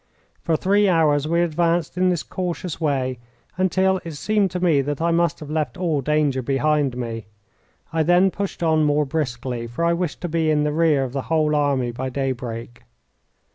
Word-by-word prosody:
For 165 -2 +1
three 200 +3 +3
hours 155 -4 +3
we 170 +2 +2
advanced 170 0 0
in 185 0 +2
this 175 -3 0
cautious 180 -2 -4
way, 130 -5 -1 0.4
until 190 0 +1
it 165 - -6
seemed 205 +6 +1
to 180 - -4
me 165 -6 +3
that 145 +1 -3
I 170 +1 +1
must 170 0 +1
have 150 -1 -7
left 155 +3 -2
all 165 -6 0
danger 145 -2 +1
behind 140 0 +1
me. 115 -3 -5 0.7
I 165 - +2
then 175 +4 +4
pushed 200 -3 -4
on 160 -1 +3
more 150 0 +2
briskly, 125 -5 -3
for 150 +9 -2
I 170 - +3
wished 170 -2 -2
to 175 - -2
be 160 -1 0
in 150 -1 +2
the 150 0 0
rear 155 -3 +3
of 130 -1 -5
the 135 - -1
whole 155 -2 +2
army 140 -4 +1
by 130 +2 -4
daybreak. 125 -3 -4
155 Hz, 190 wpm, -22 LUFS, 135-170 Hz, 0.7 s, then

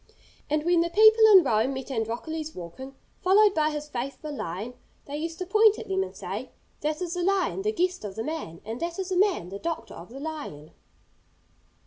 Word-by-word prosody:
And 300 0 +1
when 345 -1 +4
the 340 - 0
people 435 +4 +6
in 380 -3 +9
Rome 235 +1 +1
met 265 +1 -6
Androcles 270 +7 -3
walking, 185 +11 -9 0.3
followed 400 +2 +5
by 310 -3 +2
his 300 -1 -5
faithful 275 +3 -5
lion, 200 +4 -5 0.3
they 285 - -6
used 325 +2 -4
to 370 - -4
point 430 +3 +5
at - - -8
them 380 0 +1
and 385 - -5
say, - - -5 0.3
'That 305 +4 -2
is 345 -1 -3
the 360 - -2
lion, 385 +1 +1
the 425 +2 0
guest 365 - -1
of 200 -2 -6
the 225 - -3
man, 305 - -5
and 225 +3 -5
that 340 0 -3
is 380 -1 -3
the 375 - -1
man, 370 - +2
the 200 +1 -7
doctor 330 +5 -4
of 170 - -11
the 260 +4 -9
lion.' 285 - -7
310 Hz, 205 wpm, -27 LUFS, 250-370 Hz, 0.3 s, in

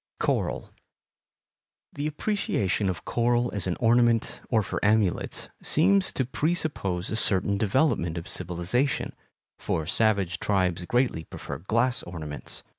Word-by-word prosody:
Coral - - -1 1.2
The 145 +1 -2
appreciation 145 - 0
of 90 - -4
coral 120 0 +1
as 100 -2 -2
an 90 - 0
ornament, 120 -1 +3
or 110 -3 +3
for - - -4
amulets, 105 -3 +1
seems 190 +4 +3
to 130 - 0
presuppose 130 - -1
a - - -1
certain 100 -2 +3
development 105 - +1
of 85 +2 -6
civilization, 90 - -1 0.5
for 80 - -2
savage 95 -2 +1
tribes 90 -3 0
greatly 120 -8 0
prefer - - -7
glass 115 +7 +1
ornaments. 80 -4 -3
105 Hz, 120 wpm, -26 LUFS, 90-125 Hz, 1.2 s, ornament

